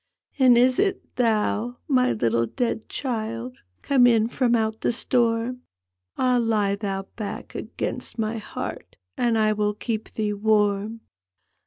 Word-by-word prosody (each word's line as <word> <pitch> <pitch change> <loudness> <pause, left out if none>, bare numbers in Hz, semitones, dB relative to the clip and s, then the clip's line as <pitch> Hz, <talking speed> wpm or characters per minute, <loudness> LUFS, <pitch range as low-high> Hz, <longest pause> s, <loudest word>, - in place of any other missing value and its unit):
" - - -35
And 255 -2 +6
is 250 +1 +4
it 395 -1 -1
thou, 230 0 +1
my 255 -3 +3
little 115 +1 +1
dead 230 - -2
child, 170 - -4 0.2
Come 260 -3 +5
in 225 -1 +3
from 240 -2 +2
out 220 -1 -1
the - - +2
stonn? 240 0 0 0.6
Ah, 250 -1 +3
lie 210 -3 +1
thou 195 -2 -3
back 215 -3 -6
against - - -4
my 225 0 -1
heart, - - -7 0.2
And 235 -2 +1
I 215 -1 +3
will 210 0 0
keep 220 0 -4
thee 210 -1 0
wann! 210 +1 +1
225 Hz, 145 wpm, -24 LUFS, 210-245 Hz, 0.6 s, And